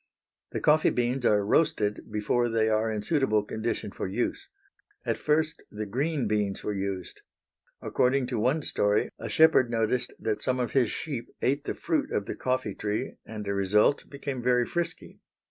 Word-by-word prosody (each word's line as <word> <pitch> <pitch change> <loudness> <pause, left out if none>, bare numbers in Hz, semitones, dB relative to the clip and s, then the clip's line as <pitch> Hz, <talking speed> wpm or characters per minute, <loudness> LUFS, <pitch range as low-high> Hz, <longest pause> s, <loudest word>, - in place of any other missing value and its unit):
The - - -3
coffee 155 +1 +4
beans 125 +1 0
are 105 -1 +3
roasted 105 -5 +1
before 120 +3 +1
they 110 -1 +2
are 110 +1 +1
in 105 -1 -3
suitable 120 -6 +2
condition 110 -1 -3
for - - -4
use. 125 - -2 0.6
At - - +1
first 155 +1 0
the 105 +1 -5
green 140 +7 -1
beans 105 -2 0
were 105 - -1
used. 95 -2 -4 0.6
According 130 +1 +2
to 115 - 0
one 135 +7 +1
story, 105 -4 +1
a - - -5
shepherd 155 -6 +5
noticed 115 +1 0
that 110 -1 -2
some 130 0 0
of 125 - -1
his 125 -5 +3
sheep 135 -7 -4
ate 140 +2 +1
the - - -2
fruit 165 -2 -1
of 100 - -1
the - - -4
coffee 130 -5 -1
tree, 105 +2 -3
and, 110 -1 -6
as 100 - -1
a - - 0
result, 105 +7 +2
became 140 -2 -5
very 125 0 +3
frisky. 170 +2 -4
120 Hz, 180 wpm, -28 LUFS, 105-140 Hz, 0.6 s, shepherd